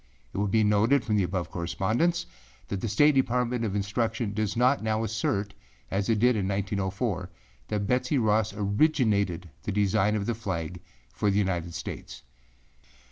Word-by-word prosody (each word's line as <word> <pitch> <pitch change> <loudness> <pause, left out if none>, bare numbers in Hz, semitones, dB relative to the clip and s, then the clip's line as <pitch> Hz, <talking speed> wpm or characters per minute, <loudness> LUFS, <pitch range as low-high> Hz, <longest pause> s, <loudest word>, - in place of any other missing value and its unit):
It - - -3
will 105 - +1
be 110 +2 +3
noted 110 +6 +3
from 110 - +1
the - - +3
above 90 -1 -2
correspondence 110 - 0 0.4
that 100 -2 -3
the - - -1
State 145 +8 +4
Department 125 -2 +1
of 110 - 0
Public 100 - -2
Instruction 110 +1 -1
does 110 0 -1
not 125 +3 +3
now 110 0 0
assert, 105 -2 -1 0.4
as 100 +2 -1
it 115 - +3
did 120 +3 +4
in 100 -3 0
1904, 100 -1 -2 0.4
that 105 -1 -1
Betsey 125 +5 +1
Ross 110 -2 +2
originated 100 - +1
the - - -3
design 100 +1 +2
of 100 -2 -1
the 120 - 0
flag 90 -6 -4 0.3
for 105 - +1
the 100 - +1
United 85 -4 -1
States. - - -7
105 Hz, 170 wpm, -27 LUFS, 100-115 Hz, 0.4 s, State